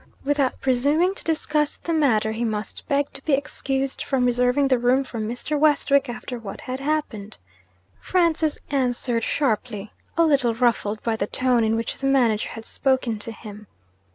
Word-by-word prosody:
Without 280 -2 0
presuming 285 +8 +2
to - - -9
discuss 305 -2 0
the 335 - -3
matter, 225 -9 +2
he 225 +2 -3
must 215 -2 -4
beg 285 -1 0
to - - -9
be 305 - 0
excused 270 -1 -1
from 260 -3 0
reserving 250 +3 +2
the 260 -2 +2
room 250 +3 +3
for 240 -3 -7
Mr. 245 +7 -2
Westwick 280 -3 +3
after 245 0 -6
what 205 -4 -8
had 255 +1 -5
happened. 275 -8 -3 0.6
Francis 330 -4 +1
answered 245 -3 0
sharply, 220 -6 -1 0.2
a 335 - +5
little 265 -7 +2
ruffled 225 -3 0
by 230 -1 0
the 200 -2 -2
tone 250 -1 +2
in 220 0 +2
which 230 0 -3
the 270 - -1
manager 240 -6 +2
had 225 0 -9
spoken 260 -5 0
to 230 - -6
him. 210 -2 -11
255 Hz, 170 wpm, -23 LUFS, 225-285 Hz, 0.6 s, a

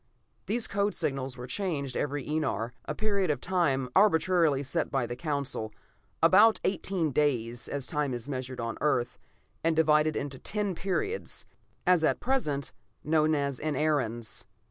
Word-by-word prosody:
These 225 +2 +1
code 200 +1 0
signals 135 -2 -2
were 125 - -6
changed 140 -3 -2
every 145 -1 -2
enar, 135 -7 -1
a - - -3
period 200 -4 0
of 145 -4 +1
time 145 -8 +1
arbitrarily 170 -7 +4
set 135 - -1
by 135 -3 0
the 120 - -5
Council; 140 -6 -2 0.5
about 205 +6 +6
eighteen 185 -4 0
days, 120 -5 0
as 140 -2 -3
time 150 -2 0
is 120 -1 -4
measured 130 -2 -5
on 115 -1 -2
the - - -14
Earth, 125 -5 0 0.4
and 165 0 +2
divided 155 -1 +4
into 140 -2 -4
ten 205 -2 -1
periods, 400 - -2 0.4
as 180 -3 +4
at - - +2
present, 150 - -1 0.3
known 155 0 +3
as 140 -3 -1
enarens. 145 -7 -1
150 Hz, 150 wpm, -29 LUFS, 130-180 Hz, 0.5 s, about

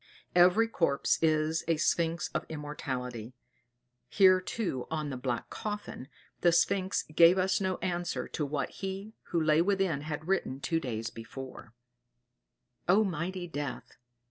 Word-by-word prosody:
Every 180 +6 +5
corpse 165 -10 +1
is 155 0 +2
a 165 -1 +2
sphynx 165 +1 +1
of - - -2
immortality; 130 -6 -5 0.7
here 185 -2 +6
too 185 - -3
on 155 -2 -2
the - - -3
black 125 -2 -3
coffin 205 -11 -5 0.3
the 175 - +4
sphynx 185 +3 +2
gave 170 +3 +7
us 190 +1 +2
no 185 -1 0
answer 175 -1 -2
to 155 - -3
what 145 -1 -2
he 195 +3 -6
who 170 - 0
lay 155 0 +4
within 190 -5 +1
had 150 +1 -5
written 180 -8 0
two 165 +3 0
days 115 -6 -4
before: 120 0 -9 1.1
"O 200 +4 +6
mighty 180 0 -3
Death! 145 -5 -6
165 Hz, 140 wpm, -30 LUFS, 140-185 Hz, 1.1 s, gave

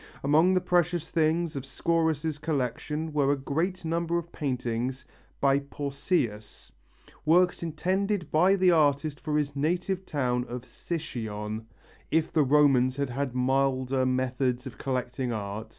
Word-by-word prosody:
Among 160 +6 +4
the 185 - +3
precious 175 -2 +1
things 165 0 +1
of 135 - -2
Scaurus' 160 +1 0
collection 150 +1 -2
were 140 -2 +3
a - - +3
great 165 +7 -2
number 170 +1 0
of 170 0 -5
paintings 125 -2 -2 0.3
by 140 0 +3
Pausias, 140 - -3 0.5
works 175 +4 +3
intended 180 +3 -1
by 180 +5 +5
the 185 -2 +4
artist 145 -2 +2
for 150 -1 -1
his 145 -1 -1
native 180 +6 -1
town 125 -7 -1
of 125 0 -5
Sycione, 110 -7 -5 0.4
if 160 0 +1
the 160 - +4
Romans 135 -3 +4
had 140 -2 -2
had 130 0 -3
milder 130 0 +1
methods 130 0 0
of 120 -5 -9
collecting 125 -1 -2
art. 105 0 -4
145 Hz, 135 wpm, -28 LUFS, 130-165 Hz, 0.5 s, by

